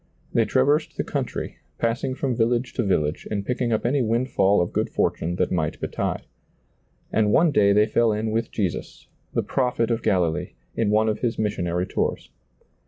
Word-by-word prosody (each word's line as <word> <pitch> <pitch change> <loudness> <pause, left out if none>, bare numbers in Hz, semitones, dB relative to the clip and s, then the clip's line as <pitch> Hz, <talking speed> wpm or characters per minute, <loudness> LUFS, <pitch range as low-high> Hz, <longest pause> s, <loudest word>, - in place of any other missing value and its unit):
They - - +3
trav - - +3
ersed 150 +2 +1
the - - 0
country, - - -4 0.2
passing 115 +3 -1
from 130 -3 -1
village 120 +2 +1
to 120 - 0
village 80 -7 0
and 100 -2 -2
picking 125 0 -1
up 110 - 0
any 135 +3 +2
windfall 115 -4 +2
of 85 - -1
good - - 0
fortune 85 +2 -1
that - - 0
might 80 -4 -1
betide. - - -3 0.9
And 105 -2 +3
one 165 +5 +4
day 100 -7 +4
they 105 +1 +5
fell 115 0 +2
in 110 +1 -1
with 115 +1 -1
Jesus, 95 -6 -3 0.3
the - - +2
prophet 125 -3 0
of 115 0 0
Galilee, 85 -4 0 0.2
in 110 -3 +1
one 110 +1 +3
of 110 0 0
His 120 -2 -1
mis 105 -1 0
sionary 90 +1 -1
tours. - - -2
110 Hz, 185 wpm, -24 LUFS, 100-120 Hz, 0.9 s, they